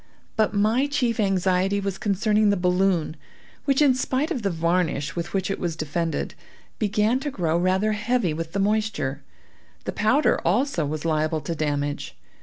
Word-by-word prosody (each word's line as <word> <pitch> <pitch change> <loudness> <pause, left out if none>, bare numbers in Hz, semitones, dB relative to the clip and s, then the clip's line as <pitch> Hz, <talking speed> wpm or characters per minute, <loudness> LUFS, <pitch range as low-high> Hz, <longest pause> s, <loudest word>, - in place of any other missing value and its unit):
But 215 -2 +2
my 220 +7 +2
chief 245 -6 0
anxiety 195 0 +2
was 195 -1 -3
concerning 210 0 +2
the 200 - +2
balloon, 180 -3 +1 0.5
which, 275 +1 +3
in 275 -3 +5
spite 260 +5 -1
of 260 - -1
the 200 - 0
varnish 165 -2 0
with 170 0 -4
which 195 0 -1
it - - -3
was 170 -3 -2
defended, 165 +1 -2 0.5
began 215 +3 +2
to 290 +2 -3
grow 170 - -1
rather 185 +4 +2
heavy 210 -4 0
with 165 +1 -5
the 200 - -1
moisture; 200 -10 0 0.6
the - - -3
powder 255 +8 +2
also 200 - +1
was 155 +2 -4
liable 155 0 0
to 170 - -3
damage. 145 -2 -2
195 Hz, 165 wpm, -24 LUFS, 165-220 Hz, 0.6 s, in